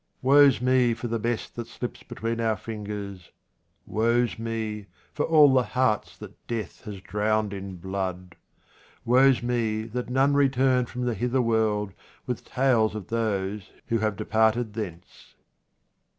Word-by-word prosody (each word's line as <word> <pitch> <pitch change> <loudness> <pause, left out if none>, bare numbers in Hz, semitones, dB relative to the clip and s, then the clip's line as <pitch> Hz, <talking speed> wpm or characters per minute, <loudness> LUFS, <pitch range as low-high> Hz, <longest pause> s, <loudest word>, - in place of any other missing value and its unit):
Woe's 140 0 +6
me 125 -2 +3
for 120 +1 -5
the 115 0 -2
best 115 +1 -3
that 120 -1 -5
slips 120 +1 -6
between 115 +1 -4
our 110 -2 +1
fingers. 100 -3 -7 0.6
Woe's 115 +2 +1
me 110 -2 -4 0.3
for 150 - -1
all 150 -4 +6
the 130 - +5 0.2
hearts 125 -5 +1
that - - -13
death 110 -6 -5
has 100 -3 -7
drowned 105 +2 0
in 95 -1 -6
blood. 90 -1 -5 0.7
Woe's 130 +1 +4
me 115 -3 0
that 120 +3 -5
none 135 +3 +3
return 130 -3 +3
from 125 +1 -5
the 120 - 0
hither 125 +5 0
world 110 -3 0 0.3
with 125 - -4
tales 120 -5 +2
of 105 -4 -7
those 105 -3 -2 0.2
who 115 -1 +1
have 110 -1 0
departed 110 +2 +1
thence. 95 -6 -8
115 Hz, 145 wpm, -26 LUFS, 105-125 Hz, 0.7 s, Woe's